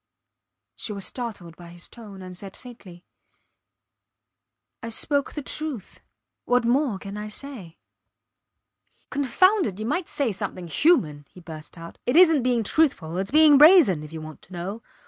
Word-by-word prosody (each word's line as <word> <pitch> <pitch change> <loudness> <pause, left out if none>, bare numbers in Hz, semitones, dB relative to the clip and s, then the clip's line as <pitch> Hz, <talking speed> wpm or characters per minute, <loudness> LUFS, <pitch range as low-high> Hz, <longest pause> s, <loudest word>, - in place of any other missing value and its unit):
She 215 - -4
was 200 -2 -3
startled 205 -9 -6
by 175 0 -13
his 170 0 -5
tone, 205 -5 -12
and 185 0 -9
said 195 +1 -9
faintly 200 -8 -14 1.8
I 230 - -6
spoke 280 +5 -1
the 295 - -5
truth. 290 - -6 0.5
What 245 -1 +2
more 250 -2 +1
can 200 +1 -8
I 210 0 -5
say? 210 - -9 1.3
Confound 370 - +3
it! 195 0 -7
You 215 - -4
might 340 +9 -1
say 275 -6 -1
something 195 -2 -5
human, 155 - +1
he - - -15
burst 160 -1 -11
out. 165 0 -11
It 245 - +1
isnt 325 -5 +6
being 245 -2 +1
truthful; 195 - 0
its 195 +1 -3
being 300 -1 +6
brazen 300 - +7
if 150 0 -10
you 160 -1 -7
want 155 0 -10
to 185 - -16
know. 190 +6 -5
215 Hz, 160 wpm, -24 LUFS, 180-280 Hz, 1.8 s, brazen